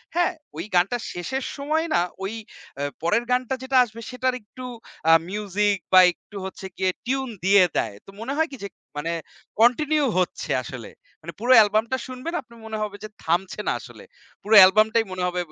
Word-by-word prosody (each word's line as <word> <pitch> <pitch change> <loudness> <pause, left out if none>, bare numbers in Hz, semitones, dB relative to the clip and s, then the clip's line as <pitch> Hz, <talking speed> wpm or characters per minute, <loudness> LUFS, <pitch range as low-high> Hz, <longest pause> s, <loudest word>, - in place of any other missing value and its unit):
হ্যাঁ? 350 +1 +2 0.2
ওই 165 - -3
গানটার 200 +7 +2
শেষের 260 +10 -3
সময়ই 310 +4 -1
না, - - +4 0.2
ওই 195 +3 -3 0.5
এ - - -1 0.2
পরের 205 +8 +2
গানটা 255 +1 +1
যেটা 260 0 +1
আসবে, 230 -1 -9
সেটার 255 0 -1
একটু 255 +5 -11 0.5
আ - - +9 0.2
music 205 0 0 0.2
বা 185 - +10
একটু 190 - -19
হচ্ছে 190 0 -8
গিয়ে 190 -1 +1
tune 265 0 -1
দিয়ে 195 0 +6
দেয়। 105 -3 -1
তো - - -15
মনে 260 +4 -3
হয় 320 - +2
কি 270 - -8
যে - - -3 0.3
মানে 165 +3 -2 0.5
continue 295 +5 +3
হচ্ছে 180 - -2
আসলে। 120 -3 -8 0.3
মানে 170 +1 -7
পুরো 245 +4 +4
album 215 +1 +2
টা 260 - +1
শুনবেন, 255 +6 -6
আপনার 235 -2 -18
মনে 220 0 -4
হবে 210 -1 -5
যে 215 - -6
থামছে 175 +5 -1
না - - +3
আসলে। - - -13 0.4
পুরো 215 +2 +3
album 215 +3 +5
টাই 230 - +4
মনে 185 -1 -3
হবে 180 0 -1
ব - - -19
215 Hz, 195 wpm, -24 LUFS, 190-255 Hz, 0.5 s, বা